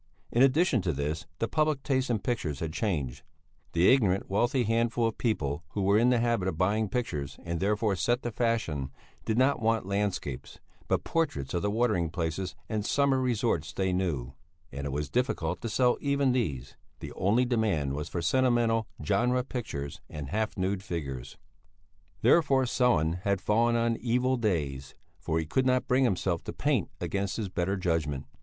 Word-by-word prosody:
In 120 - +2
addition 135 - +4
to 90 -2 -1
this 75 +4 -3
the 115 - -1
public 155 -1 0
taste 130 -2 0
in 120 - +2
pictures 95 - -2
had 80 -1 -3
changed; 75 - -2 0.5
the 85 +7 +5
ignorant 100 -8 +2
wealthy 120 +6 +1
handful 115 +1 +1
of 115 - -2
people 75 - -1
who 100 - -1
were 100 +2 +4
in 120 +2 +4
the 125 - +4
habit 115 -5 +1
of 80 - -2
buying 105 +4 +1
pictures 75 - -3
and 85 -1 -3
therefore 105 +1 +1
set 120 +6 0
the 120 - -2
fashion, 110 - -1 0.4
did 110 - 0
not 130 +3 +3
want 115 -2 +1
landscapes, 100 -9 -3 0.3
but - - +1
portraits 140 - -1
of 85 - 0
the 105 - 0
watering 105 -6 +1
places 85 +2 -3
and 105 +1 -2
summer 140 +3 +2
resorts 115 -10 0
they 95 -1 0
knew; 75 -9 -1 0.4
and 70 0 -5
it - - -4
was 75 +2 -2
difficult 90 - -1
to 115 - -3
sell 125 +2 +2
even 140 -2 +2
these; 70 - -2 0.2
the - - -7
only 110 +7 +2
demand 105 - 0
was 75 +1 -4
for 85 - -3
sentimental 120 -1 +2 0.2
genre 125 +5 +2
pictures 70 - -5
and 75 -3 -6
half 110 +2 -2
nude 95 +1 -1
figures. 70 - -5 0.9
Therefore 135 +1 +4
Sellén 90 -10 +2
had 100 0 +1
fallen 115 +4 +2
on 115 0 +1
evil 125 +2 +1
days, 75 - -2 0.2
for 80 - -1
he 80 - 0
could 130 +11 +1
not 130 0 +2
bring 130 +1 +3
himself 90 -6 0
to - - -5
paint - - 0
against 100 -1 -2
his 105 -4 -3
better 95 +2 -1
judgment. 80 -6 -1
105 Hz, 175 wpm, -29 LUFS, 80-120 Hz, 0.9 s, the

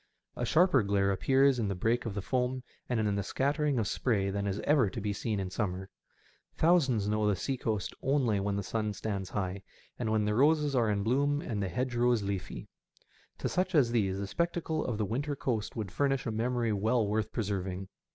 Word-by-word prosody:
A - - -2
sharper 170 -6 +4
glare 100 -1 +1
appears 135 +6 +3
in 110 - 0
the 100 - -2
break 115 +6 0
of 105 - -4
the 100 - -3
foam 130 +1 -1 0.3
and 120 -2 +1
in 105 -2 +1
the 100 - 0
scattering 140 - 0
of 110 -3 0
spray 100 -6 0
than 100 +1 -2
is 100 +1 -2
ever 140 -8 +3
to - - -5
be 105 0 -2
seen 105 +1 -2
in 95 -1 -3
summer. 95 -2 -3 0.7
Thousands 135 - +3
know 105 0 +1
the 105 - +3
sea 135 +9 -2
coast 110 -5 -2
only 130 -7 +2
when 100 0 -1
the 100 - -2
sun 105 +1 -2
stands 100 -1 -4
high, 95 0 -3 0.4
and 115 -3 -1
when 110 -1 +2
the 105 - +1
roses 145 +3 +3
are 115 -3 +3
in 100 -1 0
bloom 140 +6 +2
and 110 -8 -3
the 95 - -1
hedgerows 120 +1 +1
leafy. 100 -2 -4 0.7
To - - -2
such 185 0 0
as 130 -6 +4
these 100 -5 +1
the 100 - -3
spectacle 165 - -1
of 120 -4 -2
the 105 - 0
winter 140 +8 -2
coast 115 -6 -2
would 105 -5 -4
furnish 135 +7 0
a 115 - -1
memory 115 0 0
well 110 +3 +1
worth 105 +1 -1
preserving. 95 -3 -3
110 Hz, 210 wpm, -30 LUFS, 100-130 Hz, 0.7 s, sharper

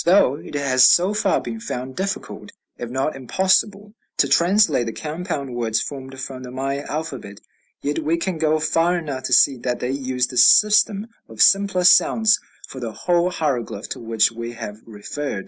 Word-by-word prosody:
Although 170 -7 +4
it 145 - -11
has 130 -3 +4
so 185 +4 +3
far 210 - +1
been 225 - -6
found 130 - -6
difficult, 195 +1 -5 0.2
if 120 - -7
not 135 +4 -2
impossible, 195 - 0 0.2
to 140 - +3
translate 170 - +2
the 115 - -4
compound 150 -4 -5
words 115 -2 -1
formed 135 0 -7
from 130 -1 -7
the 125 - -9
Maya 135 +2 -4
alphabet, 140 -10 -6 0.4
yet 145 +2 -1
we 160 +2 0
can 170 -1 -3
go 155 0 +1
far 165 +3 +1
enough 145 -6 -5
to - - -1
see 135 -2 +5
that 125 0 -3
they 125 - -3
used 130 -2 -2
the 125 - -6
system 210 - +5 0.2
of - - -13
simpler 195 -2 +4
sounds 215 +4 +4 0.3
for 130 - -9
the 120 -3 -5
whole 175 +4 0
hieroglyph 125 - -3
to - - -6
which 115 -1 +1
we 115 +1 -7
have 105 -2 -8
referred. 115 +3 -6
140 Hz, 180 wpm, -21 LUFS, 125-180 Hz, 0.4 s, see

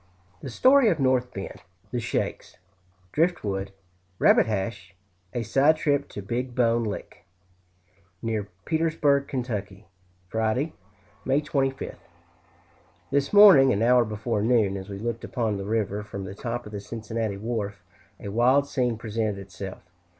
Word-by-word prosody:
The 135 - -6
story 260 - +5
of 165 -6 0
North 130 -2 +2
Bend 95 0 -7 0.3
The - - -1
"shakes" - - -3 0.5
Driftwood 105 - 0 0.5
Rabbit - - +5
Hash 95 -3 -4 0.4
A 120 - -2
side 145 +7 +3
trip 145 -2 0
To 100 - -7
Big 120 +4 -3
Bone 115 -1 +2
Lick. 105 - -6 1.0
Near 110 -3 -2 0.2
Petersburg, 155 -4 +1
Ky., 105 -6 -4 0.4
Friday, 110 - -1 0.5
May 135 +2 +2
25th. 135 -3 -2 1.1
This 140 0 +1
morning, 195 -10 +8
an 100 +3 +1
hour 125 +1 +5
before 110 0 -2
noon, 110 -4 +2
as 95 0 -7
we 100 - -5
looked 115 +2 -4
upon 110 -4 -1
the 100 - -5
river 105 -1 -1
from 100 -2 -7
the 95 0 -7
top 120 +3 -4
of 105 - -9
the 105 - -5
Cincinnati 110 -1 -4
wharf, 105 -2 -4 0.4
a 100 - -6
wild 125 +6 +3
scene 125 -5 0
presented 110 -2 -2
itself. 95 0 -8
115 Hz, 140 wpm, -26 LUFS, 105-135 Hz, 1.1 s, morning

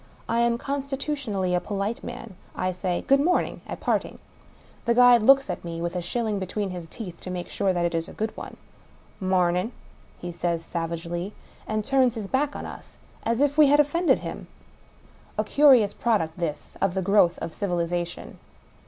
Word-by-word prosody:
I 230 - +1
am 235 0 +2
constitutionally 275 -8 -2
a 180 - +3
polite 200 +4 -3
man. 230 -4 -7 0.2
I 185 - 0
say 180 -1 -2
" - - -26
Good 275 0 +5
morning 345 +5 +1
" - - -18
at - - -5
parting. - - -1 0.7
The 235 0 +2
guide 245 -1 +7
looks 275 +4 +6
at 180 - -4
me 165 -1 -5
with 170 0 -2
the 180 - -2
shilling 220 +2 -2
be 190 - -4
tween 200 0 -2
his 175 -2 -7
teeth 180 -2 -8
to - - -6
make 180 -1 -5
sure 195 - +1
that 175 -1 0
it 170 - -1
is 165 0 -2
a - - -10
good 220 +1 -3
one. - - -8 0.3
" - - -30
Mam 185 -2 +2
in! 185 +7 -1 0.3
" - - -29
he 175 - -3
says 170 -1 -2
savagely 170 +3 -4 0.2
— - - -22
^and 215 0 0
turns 260 -1 +3
his 215 -3 -4
back 280 +6 0
on - - -5
us, - - -10 0.2
as 230 +3 0
if 290 +1 +2
we 300 - +8
had 290 +2 +5
offended 320 +4 +3
him. - - -6 0.9
A - - +2
curious 265 -8 +5
product, 185 -9 0
this, 170 -4 -4
of 195 -2 +1
the 190 - 0
growth 180 -3 +4
of 165 - -5
civilization. 175 -3 -3
200 Hz, 205 wpm, -25 LUFS, 175-245 Hz, 0.9 s, we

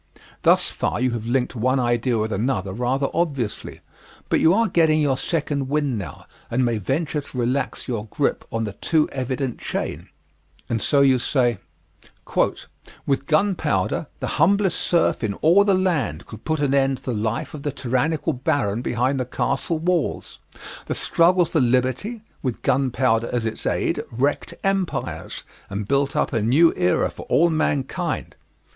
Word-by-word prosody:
Thus - - +4
far - - -2
you 130 0 +1
have 115 -1 -4
linked 125 +1 0
one 130 +3 +1
idea 120 0 +1
with 110 0 -1
another 100 -3 -1
rather 125 +5 0
obviously, 140 -10 -2 0.5
but - - +3
you 160 - +5
are 225 +4 +3
getting 160 -4 +3
your 145 -3 +2
second 140 -2 -2
wind 145 -5 0
now 95 - -8 0.2
and 125 +2 +1
may 115 -2 0
venture 150 - -1
to 140 - -11
relax 125 +2 -1
your 115 -4 -3
grip - - -1
on 115 0 -1
the 105 -3 -4
too 155 +8 +1
evident 130 -1 -3
chain; - - -4 0.6
and 115 -2 -1
so 140 +5 +3
you 135 -2 +5
say: 120 -4 +1 1.5
"With 140 0 0
gunpowder 155 - +1
the - - -1 0.2
humblest 195 +1 +3
serf 170 -7 +1
in 100 -3 -1
all 175 - +5
the 200 -2 +3
land 150 - 0
could 110 - -12
put 155 -2 0
an 140 -2 +1
end 135 -1 +2
to - - -18
the 125 - -2
life 110 +1 -2
of 150 - -7
the 145 - -2
tyrannical 145 +5 0
baron 125 -5 0
behind 125 +2 0
the 130 - -1
castle 160 +6 -1
walls. 170 -1 -1 0.5
The - - -2
struggle 175 +1 +3
for 160 -2 0
liberty, 130 - 0 0.2
with 130 -4 -3
gunpowder 125 -3 +1
as 120 -2 -1
its 110 - -3
aid, - - 0
wrecked 135 +5 -1
empires, 195 -2 -2 0.3
and 100 0 -4
built 140 +1 +1
up - - 0
a 115 - +1
new 145 +10 +4
era 90 - +1
for - - -10
all 170 +2 +4
mankind." 145 -4 -1
135 Hz, 165 wpm, -23 LUFS, 120-155 Hz, 1.5 s, you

